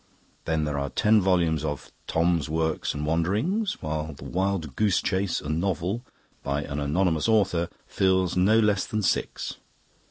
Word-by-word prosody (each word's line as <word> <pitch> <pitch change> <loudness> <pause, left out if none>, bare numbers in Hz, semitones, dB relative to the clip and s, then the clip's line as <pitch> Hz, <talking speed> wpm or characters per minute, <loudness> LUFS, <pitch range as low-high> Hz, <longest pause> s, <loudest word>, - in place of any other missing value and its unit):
Then 80 -1 0
there 75 -1 -1
are 70 0 -2
ten 105 +5 +3
volumes 85 -5 +2
of 75 -2 -4 0.2
'Thom's 85 -2 +1
Works 80 -1 -1
and 75 +1 -3
Wanderings', 105 - 0
while 75 0 -3
the 70 - -12
'Wild 90 -6 -2
Goose 105 -4 +2
Chase, 95 -1 0
a - - -7
Novel', 90 +7 -1 0.4
by 70 +1 -2
an 70 0 -4
anonymous 80 +3 +1
author, 95 -6 +2 0.2
fills 95 -2 +1
no 100 +5 +4
less 105 -3 +2
than 110 -1 -2
six. - - -1
85 Hz, 155 wpm, -26 LUFS, 75-100 Hz, 0.4 s, no